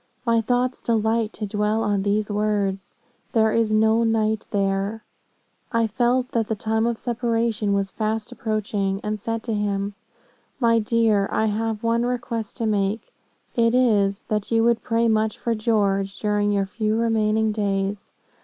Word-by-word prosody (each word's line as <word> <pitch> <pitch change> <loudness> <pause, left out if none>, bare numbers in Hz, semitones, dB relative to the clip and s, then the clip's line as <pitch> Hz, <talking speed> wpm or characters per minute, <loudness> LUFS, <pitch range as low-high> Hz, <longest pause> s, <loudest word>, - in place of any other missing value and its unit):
My 230 -1 +3
thoughts 245 +2 0
delight 225 -1 +1
to 215 - -4
dwell 210 +2 0
on 205 -1 +1
these 210 +1 0
words, 205 -2 -1 0.4
There 220 -1 +3
is 225 -1 +1
no 220 +1 +3
night 220 -1 0
there.' 200 +2 -1 0.7
"I 230 -1 +2
felt 245 +3 +1
that 225 -2 0
the 220 - -1
time 220 +2 0
of 235 -1 -1
separation 230 -3 -1
was 195 -1 0
fast 215 0 -2
approaching, 205 -3 -2
and 210 0 -2
said 225 +2 -3
to 230 - -2
him, 205 -1 -1 0.7
'My 230 -2 +4
dear, 215 -2 +2
I 220 - +1
have 220 0 -2
one 230 +1 +1
request 240 -3 -3
to 230 - -1
make; 210 0 -1 0.4
it 230 -1 +3
is, 210 -5 +2
that 210 -1 -2
you 225 -1 +3
would 235 0 +2
pray 230 0 +1
much 220 -1 +1
for 235 - -1
George, 200 -3 0
during 210 -1 +1
your 200 -1 +1
few 215 +2 -1
remaining 220 -1 +2
days. 200 -1 -2
220 Hz, 160 wpm, -23 LUFS, 205-230 Hz, 0.7 s, My